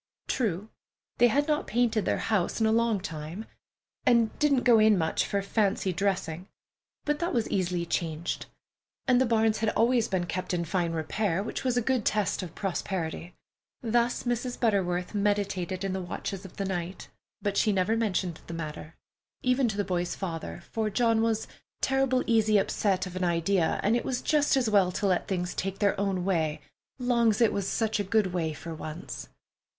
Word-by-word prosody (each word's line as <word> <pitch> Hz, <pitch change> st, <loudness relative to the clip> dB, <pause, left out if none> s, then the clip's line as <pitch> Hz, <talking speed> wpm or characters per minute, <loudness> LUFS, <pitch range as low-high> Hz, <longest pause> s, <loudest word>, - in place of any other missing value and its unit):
True, 210 Hz, -3 st, -1 dB, 0.5 s
they 240 Hz, -, +7 dB
had 285 Hz, +5 st, +2 dB
not 300 Hz, -1 st, 0 dB
painted 230 Hz, -2 st, +1 dB
their -, -, +1 dB
house 205 Hz, -3 st, 0 dB
in 220 Hz, -, +3 dB
a 220 Hz, -, +3 dB
long 230 Hz, -2 st, +2 dB
time, 165 Hz, +4 st, -6 dB, 0.6 s
and 235 Hz, -2 st, +4 dB
didn't 280 Hz, -4 st, +3 dB
go 235 Hz, -3 st, +6 dB
in 215 Hz, -1 st, +5 dB
much 160 Hz, -2 st, 0 dB
for 200 Hz, -1 st, -1 dB
fancy 200 Hz, -2 st, +1 dB
dressing, 185 Hz, -2 st, -1 dB, 0.6 s
but 295 Hz, 0 st, 0 dB
that 340 Hz, -4 st, -1 dB
was 230 Hz, -2 st, +1 dB
easily 180 Hz, -2 st, 0 dB
changed; 165 Hz, -1 st, -2 dB, 0.6 s
and 255 Hz, -1 st, +4 dB
the 260 Hz, -, +3 dB
barns 220 Hz, -1 st, +2 dB
had 220 Hz, 0 st, +1 dB
always 230 Hz, +2 st, +2 dB
been 185 Hz, -2 st, -1 dB
kept 180 Hz, +1 st, -2 dB
in 170 Hz, -1 st, -1 dB
fine 170 Hz, 0 st, 0 dB
repair, 165 Hz, +4 st, -1 dB
which 225 Hz, -, -4 dB
was 255 Hz, -2 st, +1 dB
a 245 Hz, -, +2 dB
good 255 Hz, -2 st, +1 dB
test 210 Hz, -1 st, +1 dB
of 175 Hz, -3 st, -8 dB
prosperity. 180 Hz, -3 st, -3 dB, 0.5 s
Thus 235 Hz, +1 st, +1 dB
Mrs. 245 Hz, 0 st, -2 dB
Butterworth 185 Hz, -6 st, +1 dB
meditated 200 Hz, -3 st, 0 dB
in 195 Hz, -1 st, -1 dB
the 190 Hz, -, -2 dB
watches 190 Hz, +2 st, -5 dB
of 190 Hz, -, -12 dB
the 195 Hz, -, -1 dB
night, 180 Hz, -1 st, -4 dB, 0.3 s
but 200 Hz, -1 st, -2 dB
she 215 Hz, -, +3 dB
never 195 Hz, +3 st, +2 dB
mentioned 190 Hz, -6 st, -1 dB
the 170 Hz, -, -5 dB
matter, 155 Hz, 0 st, -6 dB, 0.5 s
even 255 Hz, 0 st, +3 dB
to 215 Hz, -3 st, -3 dB
the 205 Hz, -, +1 dB
boy's 180 Hz, -2 st, -1 dB
father, 175 Hz, -2 st, -5 dB
for 220 Hz, -1 st, 0 dB
John 230 Hz, +1 st, +2 dB
was 225 Hz, -1 st, 0 dB, 0.3 s
"turrible 270 Hz, -1 st, +2 dB
easy 220 Hz, -2 st, +4 dB
upset 195 Hz, -1 st, +1 dB
of 180 Hz, -1 st, -8 dB
an 185 Hz, -, -2 dB
idea, 170 Hz, 0 st, +1 dB
an' 210 Hz, -, +3 dB
it 240 Hz, -, +1 dB
was 250 Hz, -2 st, -2 dB
just 295 Hz, -2 st, +3 dB
as 255 Hz, -3 st, +2 dB
well 200 Hz, -4 st, +4 dB
to 205 Hz, -, -2 dB
let 185 Hz, -2 st, +1 dB
things 180 Hz, -2 st, -2 dB
take 195 Hz, +1 st, -3 dB
their 200 Hz, -1 st, +1 dB
own 195 Hz, -3 st, 0 dB
way, 160 Hz, -5 st, 0 dB, 0.4 s
'long's 235 Hz, -4 st, +2 dB
it 230 Hz, -3 st, +4 dB
was 195 Hz, -1 st, -1 dB
sech 220 Hz, -2 st, 0 dB
a -, -, +1 dB
good 200 Hz, -2 st, +1 dB
way 165 Hz, -3 st, 0 dB
for 165 Hz, +2 st, -7 dB
once." 155 Hz, +1 st, -7 dB
200 Hz, 185 wpm, -28 LUFS, 180-230 Hz, 0.6 s, they